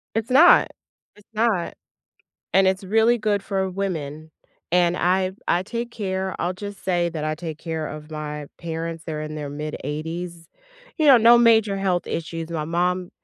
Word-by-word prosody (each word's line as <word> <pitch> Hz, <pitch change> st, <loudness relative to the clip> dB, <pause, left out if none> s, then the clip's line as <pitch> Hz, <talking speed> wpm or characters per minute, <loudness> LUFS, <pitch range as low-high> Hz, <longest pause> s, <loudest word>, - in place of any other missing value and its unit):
It's 225 Hz, +2 st, -1 dB
not, 305 Hz, +7 st, +7 dB, 0.5 s
it's 210 Hz, -, -21 dB
not. 215 Hz, -5 st, 0 dB, 0.8 s
And 195 Hz, 0 st, +5 dB
it's 190 Hz, +1 st, -1 dB
really 225 Hz, +4 st, +3 dB
good 210 Hz, -3 st, 0 dB
for 190 Hz, -2 st, -2 dB
women. 160 Hz, -5 st, -4 dB, 0.4 s
And 175 Hz, 0 st, +3 dB
I 185 Hz, +1 st, +1 dB, 0.2 s
I 175 Hz, +1 st, +2 dB
take 235 Hz, +3 st, -5 dB
care 190 Hz, -4 st, -3 dB
I'll 175 Hz, +2 st, -1 dB
just 200 Hz, +1 st, -9 dB
say, 175 Hz, -2 st, +1 dB
that 160 Hz, -3 st, -5 dB
I 155 Hz, 0 st, -1 dB
take 160 Hz, -1 st, -7 dB
care 160 Hz, -2 st, -4 dB
of 150 Hz, +1 st, -9 dB
my 150 Hz, -1 st, -5 dB
parents, 165 Hz, 0 st, -5 dB
they're 155 Hz, -2 st, -4 dB
in 155 Hz, 0 st, -6 dB
their 150 Hz, -2 st, -5 dB
mid-80s. 155 Hz, +3 st, -5 dB, 0.5 s
You 310 Hz, -, +2 dB
know, 270 Hz, -3 st, +9 dB
no 235 Hz, +1 st, +7 dB
major 220 Hz, -4 st, +4 dB
health 185 Hz, -2 st, 0 dB
issues. 165 Hz, 0 st, -4 dB
My 155 Hz, -2 st, -2 dB
mom 180 Hz, +2 st, -1 dB
180 Hz, 170 wpm, -23 LUFS, 160-200 Hz, 0.8 s, know